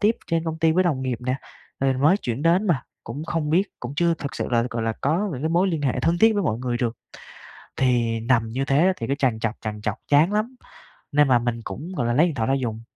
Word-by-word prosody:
tiếp 215 Hz, +2 st, +3 dB
trên 165 Hz, 0 st, 0 dB
công 160 Hz, -1 st, -3 dB
ty 160 Hz, 0 st, +3 dB
với 185 Hz, +3 st, +2 dB
đồng 140 Hz, -6 st, 0 dB
nghiệp 125 Hz, -3 st, -2 dB
nè, 125 Hz, +1 st, -1 dB, 0.5 s
rồi 135 Hz, -1 st, +3 dB
mới 145 Hz, +8 st, +4 dB
chuyển 125 Hz, -, -4 dB
đến 175 Hz, +5 st, +3 dB
mà, 160 Hz, -9 st, +1 dB, 0.2 s
cũng 140 Hz, +7 st, -6 dB
không 165 Hz, -3 st, -2 dB
biết 175 Hz, +5 st, +4 dB, 0.2 s
cũng 125 Hz, +3 st, -6 dB
chưa 170 Hz, -1 st, +3 dB
thực 140 Hz, -3 st, -6 dB
sự -, -, -3 dB
là, 115 Hz, -1 st, +3 dB
gọi 115 Hz, -1 st, -3 dB
là, 115 Hz, 0 st, 0 dB
có 170 Hz, +9 st, +1 dB
những 130 Hz, +1 st, -5 dB
cái 160 Hz, -, +1 dB
mối 175 Hz, +4 st, +2 dB
liên 160 Hz, -4 st, -2 dB
hệ 135 Hz, -, 0 dB
thân 170 Hz, +1 st, +1 dB
thiết 225 Hz, 0 st, +6 dB
với 205 Hz, -, +1 dB
mọi 115 Hz, -8 st, -1 dB
người 125 Hz, -1 st, -2 dB
được. 120 Hz, -1 st, -2 dB, 0.8 s
Thì 120 Hz, -3 st, +1 dB
nằm 115 Hz, -1 st, +1 dB
như 130 Hz, +4 st, -2 dB
thế 135 Hz, +1 st, +2 dB
á 190 Hz, -, +4 dB
thì 115 Hz, -, -4 dB
cứ 140 Hz, -, 0 dB
trằn 130 Hz, -6 st, 0 dB
trọc 115 Hz, 0 st, -1 dB
trằn 105 Hz, -1 st, -5 dB
trọc 105 Hz, -, -1 dB
chán 155 Hz, +7 st, +4 dB
lắm 225 Hz, +5 st, -1 dB, 0.6 s
nên 145 Hz, 0 st, +4 dB
là 125 Hz, -2 st, +4 dB
mình 120 Hz, -1 st, -2 dB
cũng, 165 Hz, +10 st, -7 dB
gọi 120 Hz, -, -1 dB
là, 120 Hz, -, +1 dB
lấy 155 Hz, +7 st, +5 dB
điện 165 Hz, -5 st, -2 dB
thoại 110 Hz, -1 st, -1 dB
ra 135 Hz, -, +2 dB
dùng, 115 Hz, -5 st, -2 dB
135 Hz, 275 wpm, -23 LUFS, 120-165 Hz, 0.8 s, thiết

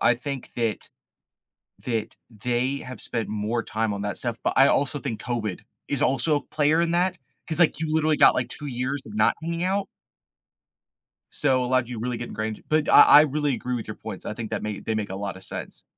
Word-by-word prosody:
I 120 Hz, -, +4 dB
think 135 Hz, +2 st, -6 dB
that 115 Hz, -3 st, -2 dB, 0.9 s
that 115 Hz, -3 st, -3 dB
they 120 Hz, +5 st, -1 dB
have 125 Hz, -1 st, -9 dB
spent 115 Hz, -2 st, -3 dB
more 110 Hz, +2 st, -1 dB
time 110 Hz, 0 st, -1 dB
on 100 Hz, 0 st, -4 dB
that 105 Hz, -, -3 dB
stuff, 120 Hz, -2 st, -3 dB
but -, -, 0 dB
I 135 Hz, +1 st, +7 dB
also 145 Hz, +1 st, +1 dB
think 120 Hz, -6 st, -4 dB
COVID 110 Hz, -6 st, -3 dB, 0.3 s
is 145 Hz, -, -1 dB
also 135 Hz, +4 st, +2 dB
a 145 Hz, -, -2 dB
player 155 Hz, +2 st, +2 dB
in 170 Hz, 0 st, +1 dB
that, 180 Hz, +1 st, +1 dB, 0.3 s
'cause, 165 Hz, +1 st, -2 dB
like, 160 Hz, -, +4 dB
you 155 Hz, -1 st, -1 dB
literally 155 Hz, -1 st, +3 dB
got, -, -, +7 dB
like, 125 Hz, -1 st, -1 dB
2 150 Hz, -, -9 dB
years 130 Hz, +2 st, -2 dB
of -, -, -10 dB
not -, -, +3 dB
hanging 170 Hz, +1 st, -2 dB
out 195 Hz, +1 st, 0 dB, 1.5 s
so 130 Hz, -1 st, +1 dB
it -, -, -1 dB
allowed 130 Hz, -1 st, +1 dB
you 120 Hz, -3 st, -5 dB
really 120 Hz, +1 st, -2 dB
get 120 Hz, +1 st, -6 dB
ingrained, 110 Hz, 0 st, -4 dB
but 155 Hz, 0 st, +2 dB
I -, -, +9 dB
I 145 Hz, -, +9 dB
really 150 Hz, -2 st, 0 dB
agree 125 Hz, +1 st, -3 dB
with 115 Hz, -, -5 dB
your 110 Hz, -, -6 dB
points, 110 Hz, -4 st, -8 dB
I -, -, -2 dB
think 115 Hz, -1 st, -6 dB
that -, -, -2 dB
may 105 Hz, -1 st, -4 dB
they 110 Hz, -, -2 dB
make 105 Hz, -3 st, -2 dB
a 95 Hz, -, -4 dB
lot 100 Hz, -2 st, -4 dB
of 95 Hz, -, -11 dB
sense. -, -, -7 dB
125 Hz, 225 wpm, -25 LUFS, 110-150 Hz, 1.5 s, I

